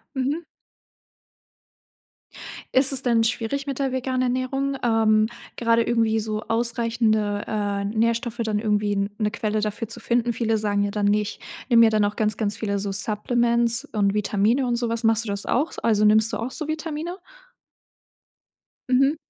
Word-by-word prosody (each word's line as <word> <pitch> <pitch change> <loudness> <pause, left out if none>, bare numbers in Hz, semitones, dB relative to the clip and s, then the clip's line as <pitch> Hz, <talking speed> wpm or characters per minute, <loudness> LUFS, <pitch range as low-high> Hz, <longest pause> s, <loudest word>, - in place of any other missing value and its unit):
Mhm. 275 +5 -1 2.3
Ist 270 +1 +6
es 265 - +4
denn 230 -2 +2
schwierig 245 +5 -2
mit 275 -1 -4
der 270 -1 0
veganen 255 0 -1
Ernährung, 260 +2 -1
ähm, 220 -2 +3 0.3
gerade 230 0 +2
irgendwie 225 -2 +1
so 215 0 -3
ausreichende, 225 -3 0
äh, 205 -2 -2
Nährstoffe 230 +3 -1
dann 210 -1 0
irgendwie 205 -2 0
'ne 215 -2 0
Quelle 215 -1 -2
dafür 210 +1 -3
zu 235 - -8
finden? 235 +1 0
Viele 225 -1 0
sagen 205 -1 0
ja 200 - -3
dann: 205 -1 0
„Ne, 205 +1 +3
ich 210 0 -5 0.3
nehme 235 -3 +5
mir 225 - +7
dann 215 -1 +2
auch 205 - -2
ganz 215 -1 0
ganz 210 -2 -1
viele 200 -2 -2
so 195 0 -3
Supplements 235 +4 +1
und 200 -2 +1
Vitamine 210 +5 +1
und 240 -1 0
sowas.“ 230 -1 -2
Machst 225 0 +2
du - - -7
das 200 0 -2
auch? 290 +7 0
Also, 215 -2 +3
nimmst 215 +1 +4
du - - -2
auch 240 +3 -4
so 310 -1 -5
Vitamine? 320 +3 -4 1.7
Mhm. 270 +4 +3
225 Hz, 165 wpm, -23 LUFS, 210-245 Hz, 2.3 s, mir